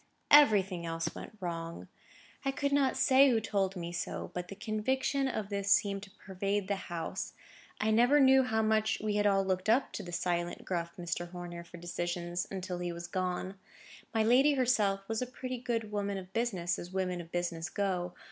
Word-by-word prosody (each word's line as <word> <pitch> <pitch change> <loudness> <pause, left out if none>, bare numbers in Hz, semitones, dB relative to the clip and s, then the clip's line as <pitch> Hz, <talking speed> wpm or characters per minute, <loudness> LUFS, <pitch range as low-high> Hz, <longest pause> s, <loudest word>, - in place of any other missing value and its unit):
Everything 200 -11 +6
else 165 0 -3
went 215 - -9
wrong. 170 -2 -5 0.6
I 275 - 0
could 280 +1 -1
not 275 -2 +2
say 265 +1 +6
who 235 -3 +3
told 200 -3 -1
me 170 -1 -5
so—but 175 0 -4
the 200 - -8
conviction 260 +6 0
of 215 -6 -3
this 200 -1 -1
seemed 200 -1 +3
to 200 - -10 0.2
pervade 195 +1 -1
the 200 - +1
house. 170 -1 -4 0.5
I 215 +1 +2
never 245 +6 +5
knew 265 -1 +7
how 220 -4 +1
much 215 0 +2
we 210 -1 -1
had 205 0 +3
all 195 -1 +3
looked 185 +1 -1
up 245 +5 +3
to - - -4
the 175 - -8
silent, 175 0 -2
gruff 170 -1 -3
Mr. 175 0 -3
Horner 175 -1 -7
for 170 0 -12
decisions, 175 0 -3
until 185 -2 -4
he 175 0 -2
was 170 0 -6
gone. 185 +1 -3 0.5
My 225 -2 +2
lady 265 +6 +5
herself 210 -7 +2
was 225 +1 -1
a 250 - -2
pretty 255 0 -5
good 230 -3 -2
woman 200 -1 -1
of 190 0 -9
business, 190 -7 -1
as 175 - -7
women 185 -1 -2
of 165 0 -13
business 175 -1 -2
go. 180 -3 -2
195 Hz, 190 wpm, -32 LUFS, 175-225 Hz, 0.6 s, knew